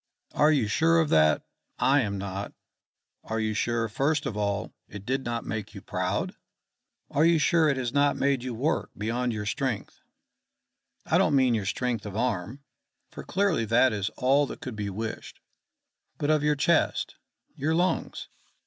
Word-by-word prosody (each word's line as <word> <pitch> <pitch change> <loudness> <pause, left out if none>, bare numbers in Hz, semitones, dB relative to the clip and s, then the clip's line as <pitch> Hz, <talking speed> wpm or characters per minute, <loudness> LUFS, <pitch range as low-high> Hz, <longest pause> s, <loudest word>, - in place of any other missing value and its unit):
"Are 150 +1 +4
you 135 -8 +2
sure 165 +9 +3
of 160 -2 +1
that? 75 -1 +4 0.3
I 140 +1 +4
am 100 -4 -2
not. 100 +1 -5 0.7
Are 110 0 -3
you 110 -1 0
sure, 115 +1 0
first 140 +7 0
of 120 - -3
all, 100 -1 -2
it 100 -1 -10
did 130 +3 -1
not 120 -1 -3
make 110 0 -5
you 100 - -8
proud? 90 +1 -2 0.8
Are 145 - +2
you 165 0 +5
sure 160 0 +3
it 140 - +1
has 125 -2 -2
not 145 0 +3
made 140 -2 +1
you 125 -1 -4
work 140 +8 -1
beyond 120 +3 -1
your 105 -2 -4
strength 120 0 -3 1.0
I - - +3
don't 150 - +3
mean 130 -3 +4
your 105 -4 -1
strength 115 -1 -2
of 100 0 -6
arm, 120 +2 -2 0.5
for - - -8
clearly 190 -9 +1
that 120 +3 +4
is 100 0 -1
all 140 +3 +3
that - - -8
could 125 -4 -6
be 105 -1 -3
wished, 110 +3 -6 0.8
but 145 +1 0
of 155 -1 +3
your 150 0 +2
chest, 160 +3 +1 0.4
your 155 +2 0
lungs? 175 0 -1
125 Hz, 175 wpm, -27 LUFS, 105-145 Hz, 1.0 s, you